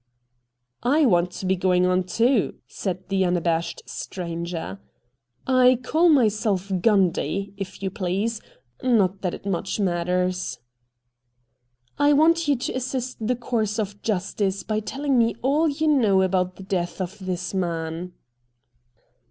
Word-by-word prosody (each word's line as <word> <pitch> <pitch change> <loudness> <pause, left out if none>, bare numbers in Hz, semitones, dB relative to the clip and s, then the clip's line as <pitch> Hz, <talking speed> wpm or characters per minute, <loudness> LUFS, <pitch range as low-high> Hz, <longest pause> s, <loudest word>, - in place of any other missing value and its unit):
' 125 +1 -54 0.2
I 315 - +5
want 175 -6 +3
to - - -6
be 190 +1 +2
going 180 0 +2
on, 180 0 +2
too,' 230 +4 +2
said 185 -1 -4
the 195 -1 +2
un 180 -1 +2
abashed 170 0 -1
stranger. 170 - -5 0.4
' 125 -2 -45 0.2
I 250 0 +6
call 330 +6 +3
myself 215 - +2
Gundy, 195 0 +1
if 195 0 -7
you 190 - -1
please 200 +5 -2 0.3
— 120 0 -44
not 200 -6 +2
that 180 -2 -2
it - - -13
much 195 +1 -2
matters.' 180 0 0 1.4
'I 290 0 +5
want 330 +2 +4
you 285 - +4
to 250 - -3
assist 255 0 -3
the 250 - +2
course 225 -3 -1
of 205 -2 -3
justice 195 -1 -1
by 215 -1 -1
telling 270 +4 0
me 230 0 +2
all 300 +5 +3
you 300 +2 -2
know 215 -10 +4
about 185 -1 0
the 190 - -10
death 185 -2 -2
of 190 +3 -4
this 185 0 -3
man.' 170 -1 -3
195 Hz, 150 wpm, -24 LUFS, 180-230 Hz, 1.4 s, I